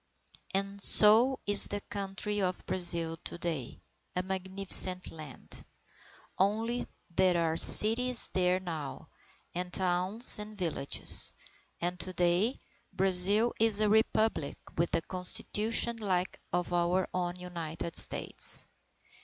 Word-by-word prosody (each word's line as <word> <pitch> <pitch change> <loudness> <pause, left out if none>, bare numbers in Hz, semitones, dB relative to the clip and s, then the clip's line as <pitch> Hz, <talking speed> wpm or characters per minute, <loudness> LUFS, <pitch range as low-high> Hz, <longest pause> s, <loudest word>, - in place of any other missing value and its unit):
And 195 +1 -4
so 225 +7 +6
is 205 0 +4
the 205 - -6
country 205 +1 -7
of 185 -1 -5
Brazil 170 -3 -2
to 170 - -9
day 160 -8 -7 0.3
a 180 - -4
magnificent 190 -1 +1
land! 155 -5 -13 0.8
Only 225 +5 -3 0.2
there 180 0 -1
are 165 -1 -3
cities 235 +7 +9
there 180 0 -2
now, 160 -6 -10 0.4
and 180 +1 -7
towns 185 +6 0
and 210 0 -11
villages. 165 -6 -3 0.4
And 180 +1 -6
to 185 - -6
day, 180 +7 -2 0.3
Brazil 195 +5 0
is 220 -2 +1
a 215 -1 0
Republic 220 -6 -2 0.2
with 170 +1 -3
a 165 - -4
Constitution 210 +6 -2
like 190 -4 -4
that - - -20 0.2
of 175 0 -7
our 175 +2 -3
own 175 -1 -5
United 170 -2 -10
States. - - +1
185 Hz, 120 wpm, -27 LUFS, 175-210 Hz, 0.8 s, cities